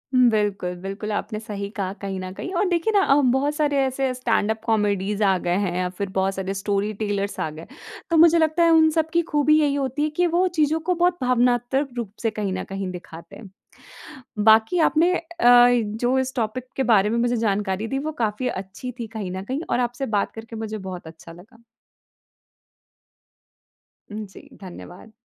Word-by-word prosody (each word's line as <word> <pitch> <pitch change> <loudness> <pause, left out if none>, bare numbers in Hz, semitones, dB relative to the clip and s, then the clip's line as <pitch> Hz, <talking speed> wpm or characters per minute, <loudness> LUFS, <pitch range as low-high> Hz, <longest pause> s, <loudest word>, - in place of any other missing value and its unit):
हुँ, 250 -1 +6
बिल्कुल, 205 -4 -1
बिल्कुल, 195 +3 -5
आपने 215 +1 -3
सही 205 -3 -6
कहा 200 -3 -4
कहीं 195 -1 -4
न 185 0 -6
कहीं 360 - -6
और 410 - +2
देखिए 350 +4 +1
ना 405 - +5
अ, 275 - +4
बहुत 270 +3 +1
सारे 295 -2 +1
ऐसे 265 0 -1
स्टैंडअप 220 -3 0
कॉमेडीज़ 210 -2 0
आ 195 -2 +3
गए 175 0 -1
हैं 175 -2 -3
या 180 0 -1
फिर 195 +2 -5
बहुत 190 0 0
सारे 190 0 -3
स्टोरीटेलर्स 205 0 -2
आ - - -1
गए, 155 +2 -10 0.4
तो 335 - +2
मुझे 335 +1 +7
लगता 320 +1 +2
है 335 - +5
उन 320 -1 +6
सबकी 320 +2 +1
खूबी 300 +1 +4
यही 290 -2 +2
होती 275 +1 -1
है 305 - +1
कि 350 +4 +1
वो 350 +2 +2
चीज़ों 310 +1 +2
को - - +4
बहुत 350 +1 +2
भावनात्मक 250 +2 +1
रूप 230 -5 -4
से 225 - +1
कहीं 210 -3 -3
न 185 - -3
कहीं 195 -1 -4
दिखाते 170 -2 -11
हैं। 215 -3 -12 1.0
बाकी 220 +10 +5
आपने 340 +4 +2
अ, 335 - -3 0.2
जो 245 0 +4
इस 260 0 -2
टॉपिक 235 +2 -3
के 270 - +1
बारे 205 0 +3
में 230 - 0
मुझे 240 +1 +1
जानकारी 205 -2 -1
दी 270 - -2
वो 310 +3 -3
काफ़ी 220 +4 -1
अच्छी 195 +5 -6
थी 230 - -3
कहीं 200 -4 -4
न 190 +1 -5
कहीं 260 +7 -3
और 245 - +1
आपसे 245 +2 -2
बात 200 - 0
करके 225 +1 -9
मुझे 220 -1 -5
बहुत 180 -3 -7
अच्छा 160 +1 -12
लगा। 205 +7 -17 2.5
हुँ, 215 +1 -5
जी 195 - -15
धन्यवाद। 185 +2 -11
225 Hz, 190 wpm, -23 LUFS, 195-270 Hz, 2.5 s, मुझे